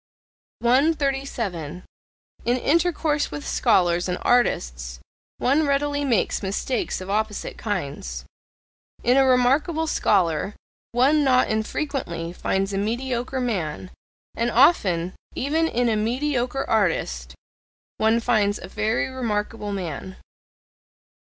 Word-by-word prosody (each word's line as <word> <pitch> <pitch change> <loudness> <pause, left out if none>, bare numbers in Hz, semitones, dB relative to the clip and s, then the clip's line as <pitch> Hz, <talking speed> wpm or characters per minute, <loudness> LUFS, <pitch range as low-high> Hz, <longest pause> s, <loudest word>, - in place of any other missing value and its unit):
137. 250 - 0 0.6
In 245 +1 +2
intercourse 310 0 +1
with 145 -1 -6
scholars 175 0 +2
and 180 - -1
artists - - +1 0.4
one 285 +4 +2
readily 285 +1 0
makes 240 -8 +1
mistakes 200 +3 -2
of 185 - -7
opposite 215 0 -2
kinds: 140 - -4 0.8
in 245 +2 +4
a 270 - +6
remarkable 270 +6 +3
scholar 195 - +1 0.4
one 275 +5 +3
not 255 -2 +3
infrequently 220 - -3
finds 195 +2 -1
a 195 - 0
mediocre 245 +4 -2
man; 185 -8 -3 0.4
and 235 +1 0
often, 195 - +3 0.2
even 320 +4 +1
in 245 -4 0
a 225 - +2
mediocre 250 +3 -1
artist, 65 - 0 0.6
one 220 +1 +3
finds 215 -4 +2
a - - -9
very 215 +4 0
remarkable 220 -4 -3
man. 185 -1 -5
230 Hz, 105 wpm, -24 LUFS, 185-270 Hz, 0.8 s, a